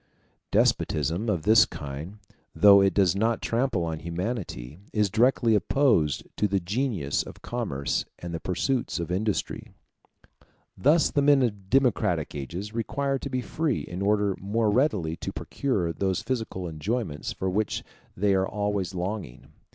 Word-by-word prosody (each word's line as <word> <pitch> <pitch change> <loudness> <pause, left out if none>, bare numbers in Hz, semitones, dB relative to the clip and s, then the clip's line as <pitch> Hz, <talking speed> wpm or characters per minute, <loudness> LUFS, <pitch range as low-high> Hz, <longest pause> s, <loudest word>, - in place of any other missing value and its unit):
Despotism 80 - +1
of 90 -7 0
this 110 +2 +7
kind, 75 +8 -7 0.4
though 100 -1 +8
it 95 0 +4
does 95 -3 +3
not 115 +3 +1
trample 115 -6 0
on 80 -1 -3
humanity, 85 - -4
is 105 -3 +1
directly 115 0 +3
opposed 105 - +2
to 105 - +2
the 100 -1 +1
genius 95 - -1
of - - -11
commerce 100 - -2
and 85 -1 -7
the 85 - -3
pursuits 115 +7 -1
of 85 0 -4
industry. 105 +3 -2 1.0
Thus 155 +4 +3
the 145 - +2
men 140 -1 +5
of 100 -5 -3
democratic 105 - +2
ages 85 - -6
require 135 +4 -1
to 140 - -5
be 130 -1 -1
free 150 +2 -1
in 90 +2 -6
order 100 -1 +2
more 105 +2 0
readily 105 - +1
to - - -5
procure 95 -12 -2
those 95 +4 -1
physical 110 -7 -3
enjoyments 80 - -3
for 95 - -3
which 100 +3 -1 0.3
they 100 +1 +2
are 95 0 +2
always 100 -2 -2
longing. 90 - -5
100 Hz, 150 wpm, -26 LUFS, 85-115 Hz, 1.0 s, though